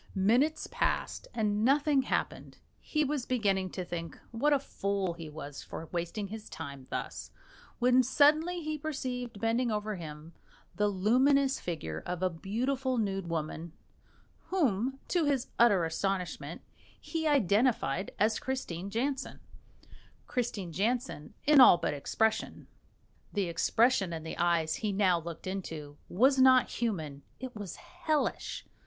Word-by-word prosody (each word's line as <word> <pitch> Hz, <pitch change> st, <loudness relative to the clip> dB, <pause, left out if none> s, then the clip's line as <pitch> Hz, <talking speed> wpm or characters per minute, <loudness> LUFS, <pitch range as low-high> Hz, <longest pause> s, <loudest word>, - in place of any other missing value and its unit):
Minutes 240 Hz, +11 st, +2 dB
passed, -, -, -1 dB
and 210 Hz, -2 st, 0 dB
nothing 285 Hz, +2 st, +4 dB
happening, 260 Hz, -, -3 dB, 0.2 s
he 305 Hz, -1 st, 0 dB
was 280 Hz, -3 st, -2 dB
beginning 195 Hz, -6 st, +1 dB
to 185 Hz, -1 st, -5 dB
think 165 Hz, -2 st, -5 dB
what 240 Hz, +6 st, +1 dB
a 290 Hz, -, +5 dB
fool 200 Hz, -8 st, -2 dB
he 165 Hz, -2 st, -8 dB
was 145 Hz, -2 st, -8 dB
for 165 Hz, -, -7 dB
wasting 175 Hz, +4 st, -3 dB
his 215 Hz, 0 st, -8 dB
time 140 Hz, -2 st, -8 dB
thus, -, -, -5 dB, 0.5 s
when 250 Hz, +1 st, +5 dB
suddenly 305 Hz, +7 st, +3 dB
he 310 Hz, 0 st, -3 dB
perceived 250 Hz, -7 st, -4 dB
bending 230 Hz, +3 st, +1 dB
over 210 Hz, -1 st, -2 dB
him 155 Hz, 0 st, -9 dB, 0.4 s
the 210 Hz, 0 st, +2 dB
luminous 260 Hz, +8 st, +3 dB
figure 80 Hz, -, -4 dB
of 180 Hz, +1 st, -3 dB
a 185 Hz, -, +2 dB
beautiful 250 Hz, -, -1 dB
nude 195 Hz, -5 st, -1 dB
woman, 160 Hz, 0 st, -4 dB, 0.7 s
whom, 265 Hz, -, +1 dB
to 345 Hz, -3 st, +1 dB
his 275 Hz, -4 st, 0 dB
utter 205 Hz, -7 st, +5 dB
astonishment, 180 Hz, +2 st, -3 dB, 0.4 s
he 320 Hz, -1 st, -2 dB
identified 210 Hz, -, +2 dB
as 215 Hz, +1 st, +2 dB
Christine 200 Hz, -9 st, -4 dB
Jansen 260 Hz, +5 st, -2 dB, 0.9 s
Christine 215 Hz, -8 st, -3 dB
Jansen 225 Hz, -, -2 dB
in 295 Hz, -2 st, +7 dB
all 215 Hz, -, +9 dB
but -, -, -1 dB
expression. 220 Hz, +10 st, -1 dB, 0.7 s
The 205 Hz, -, +1 dB
expression 195 Hz, +3 st, +2 dB
in 160 Hz, -1 st, -5 dB
the 160 Hz, -, -6 dB
eyes 170 Hz, -2 st, +2 dB
he 215 Hz, -2 st, -1 dB
now 190 Hz, -3 st, +3 dB
looked 165 Hz, 0 st, -8 dB
into 165 Hz, -6 st, -5 dB
was 260 Hz, +8 st, +4 dB
not 260 Hz, -1 st, +6 dB
human 160 Hz, -12 st, -3 dB, 0.2 s
it 255 Hz, -2 st, -7 dB
was 205 Hz, -5 st, -6 dB
hellish. 310 Hz, -2 st, -2 dB
210 Hz, 135 wpm, -31 LUFS, 175-260 Hz, 0.9 s, all